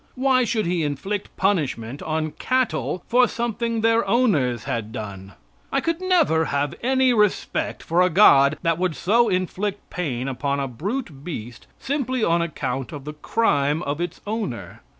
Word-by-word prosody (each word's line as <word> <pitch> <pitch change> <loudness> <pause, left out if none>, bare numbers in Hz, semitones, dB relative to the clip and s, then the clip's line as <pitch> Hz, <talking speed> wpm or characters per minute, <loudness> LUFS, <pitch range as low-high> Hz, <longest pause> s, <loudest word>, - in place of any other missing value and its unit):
Why 255 -1 +3
should 225 -2 0
he 175 0 0
inflict 170 +8 -3
punishment 145 - -1
on 155 0 -2
cattle 245 - -1
for 245 +1 +4
something 230 0 -2
their 225 +1 +3
owners 145 - +2
had 110 -2 -3
done? 100 -3 -7 0.4
I 275 - +2
could 330 +4 -2
never 325 - +3
have 140 -1 -1
any 260 0 +3
respect 210 -3 0
for 170 +2 +2
a 180 - +4
God 155 -6 +6
that 165 -1 +1
would 180 -3 0
so 230 +6 +3
inflict 190 +2 -2
pain 135 -8 -3
upon 140 +2 -1
a 135 - -1
brute 160 - -5
beast 120 -9 -7
simply 260 -3 -2
on 170 -2 +3
account 135 -6 -3
of 140 -2 -8
the 150 - -5
crime 150 -3 +1
of 145 +2 -3
its 175 0 -4
owner. 200 - -4
175 Hz, 160 wpm, -23 LUFS, 140-230 Hz, 0.4 s, God